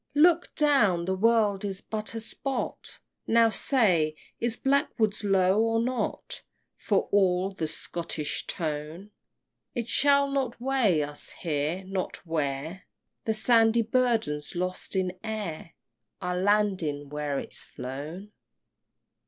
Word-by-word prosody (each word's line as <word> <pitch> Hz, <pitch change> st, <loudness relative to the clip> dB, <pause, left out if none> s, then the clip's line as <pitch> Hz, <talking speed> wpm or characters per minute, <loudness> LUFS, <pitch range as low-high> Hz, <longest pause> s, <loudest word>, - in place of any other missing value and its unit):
Look 340 Hz, +3 st, +4 dB
down! 215 Hz, -, +3 dB
the 190 Hz, -, 0 dB
world 210 Hz, -1 st, +2 dB
is 195 Hz, -2 st, -3 dB
but 215 Hz, +2 st, -4 dB
a -, -, -2 dB
spot. 265 Hz, +4 st, -3 dB, 0.3 s
Now 230 Hz, 0 st, +5 dB
say 180 Hz, -, +2 dB, 0.2 s
Is 230 Hz, -1 st, 0 dB
Blackwood's 230 Hz, -7 st, +1 dB
low 195 Hz, 0 st, +3 dB
or 225 Hz, 0 st, +2 dB
not, 250 Hz, +2 st, -2 dB, 0.3 s
For -, -, 0 dB
all 190 Hz, -1 st, +3 dB
the 165 Hz, -5 st, -3 dB
Scottish 155 Hz, -2 st, -4 dB
tone? 160 Hz, +4 st, -4 dB, 0.6 s
It 235 Hz, -2 st, -2 dB
shall 280 Hz, +2 st, +4 dB
not 265 Hz, -4 st, -1 dB
weigh 240 Hz, -, +2 dB
us 145 Hz, 0 st, -4 dB
here 160 Hz, +3 st, -1 dB
not 190 Hz, 0 st, -4 dB
where 155 Hz, +2 st, -3 dB, 0.4 s
The 220 Hz, -, +1 dB
sandy 225 Hz, 0 st, +4 dB
burden's 225 Hz, -, 0 dB
lost 185 Hz, +2 st, -3 dB
in 185 Hz, -1 st, -1 dB
air 205 Hz, -7 st, -5 dB, 0.5 s
Our 180 Hz, -1 st, -2 dB
lading 185 Hz, -7 st, +1 dB
where 150 Hz, -1 st, -2 dB
is't -, -, -5 dB
flown? 155 Hz, +10 st, -6 dB
195 Hz, 120 wpm, -27 LUFS, 165-230 Hz, 0.6 s, Now